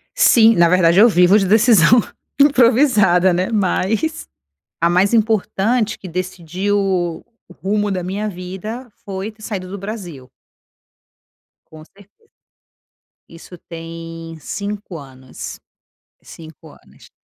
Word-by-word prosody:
Sim, 225 -1 +5
na 170 -2 +4
verdade, 180 0 +3
eu 230 - +8
vivo 180 0 +4
de 195 - -1
decisão 220 0 +5 0.4
improvisada, 235 -9 +4
né, 180 +2 -1
mas 220 - -1 0.5
a 170 - +3
mais 185 +5 +2
importante, 220 +1 0
que 190 - -11
decidiu 185 +2 -3
o 180 -4 -2 0.3
o - - -14
rumo 205 +3 -2
da 185 -3 -3
minha 200 +4 -4
vida 200 +6 -7 0.2
foi 195 +2 -5
ter 215 0 -23
saído 190 -4 -6
do 200 - -7
Brasil. 185 - -8 1.4
Com 155 -1 -14
certeza. 200 - -23 1.1
Isso 170 +2 -13
tem 165 0 -10
5 200 +3 -6
anos. 130 - -10 0.6
5 160 -2 -14
anos. - - -20
190 Hz, 120 wpm, -18 LUFS, 170-215 Hz, 1.4 s, eu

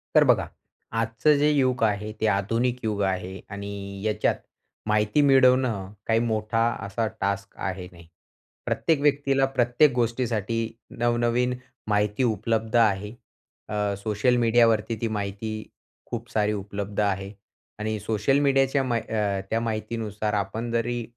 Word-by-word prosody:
तर - - +8
बघा. - - 0 0.4
आजचं 115 +6 +2
जे 150 +1 +3
युग 130 -5 +2
आहे 105 0 0
ते 110 - +3
आधुनिक 115 +5 +1
युग 105 -2 -1
आहे 95 +1 -4
आणि 100 -1 -6
याच्यात 110 -1 +1 0.5
माहिती 105 +6 +2
मिळवणं 130 -7 +4 0.2
काही 115 0 +3
मोठा 115 0 0 0.2
असा 110 +3 -1
टास्क 100 0 -2
आहे 95 -1 -4
नाही. 85 -2 -15 0.6
प्रत्येक 160 -4 +1
व्यक्तीला 140 -2 +3
प्रत्येक 120 +5 +4
गोष्टीसाठी 115 -2 0 0.4
नवनवीन 120 +1 +1 0.3
माहिती 105 +2 +1
उपलब्ध 110 0 0
आहे. 105 -3 +3 0.6
अ, 105 -1 -1
सोशल 110 +4 +1
मीडियावरती 115 -1 +3
ती 115 - +1
माहिती 100 +2 -4 0.5
खूप 120 0 -6
सारी 105 -1 +1
उपलब्ध 100 0 -4
आहे. 100 -1 -1 0.5
आणि 110 0 -2
सोशल 110 +6 +1
मीडियाच्या 135 -1 +3
मा 120 -3 0
अ, 105 -3 -1
त्या 115 - +1
माहितीनुसार 110 -2 -3
आपण 105 +4 -2
जरी 120 +1 -1
110 Hz, 130 wpm, -25 LUFS, 105-120 Hz, 0.6 s, तर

